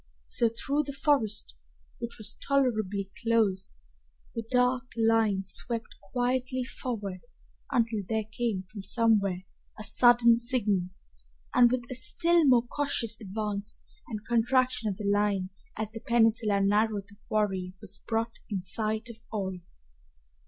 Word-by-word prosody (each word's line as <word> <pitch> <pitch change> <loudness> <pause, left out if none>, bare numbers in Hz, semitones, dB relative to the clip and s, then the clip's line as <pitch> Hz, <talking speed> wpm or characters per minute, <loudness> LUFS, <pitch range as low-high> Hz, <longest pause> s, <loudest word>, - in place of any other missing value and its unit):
So 230 - +2
through 280 +6 -1
the 280 - -4
forest, 265 - 0 0.5
which 235 - -5
was 215 - -2
tolerably 215 -8 0
close, 215 -5 +1 0.6
the 230 - -2
dark 250 0 +1
line 225 -3 +2
swept 230 +4 +2 0.2
quietly 255 +1 0
forward 210 -7 -5 0.5
until 230 -3 +1
there 220 -1 0
came 215 -2 -3
from 200 +2 -9
somewhere 200 -4 +2 0.3
a 215 - -7
sudden 240 +1 +6
signal, 220 -7 +1 0.6
and 240 -1 +6
with 255 -1 0
a - - -1
still 335 +5 +3
more 250 -3 +5
cautious 240 -4 -1
advance 205 0 -4 0.3
and 215 -2 -6
contraction 240 0 +2
of 190 - -4
the 210 - -5
line 200 -2 +1 0.3
as 215 -1 -3
the 225 - -7
peninsula 225 -3 +3
narrowed 205 0 +1
the 205 0 -18
quarry 190 -4 -1
was 205 -2 -10
brought 230 0 -2
in 195 -4 -3
sight 215 +3 -2
of 225 -1 -15
all. 190 -4 -3
225 Hz, 135 wpm, -28 LUFS, 205-240 Hz, 0.6 s, sudden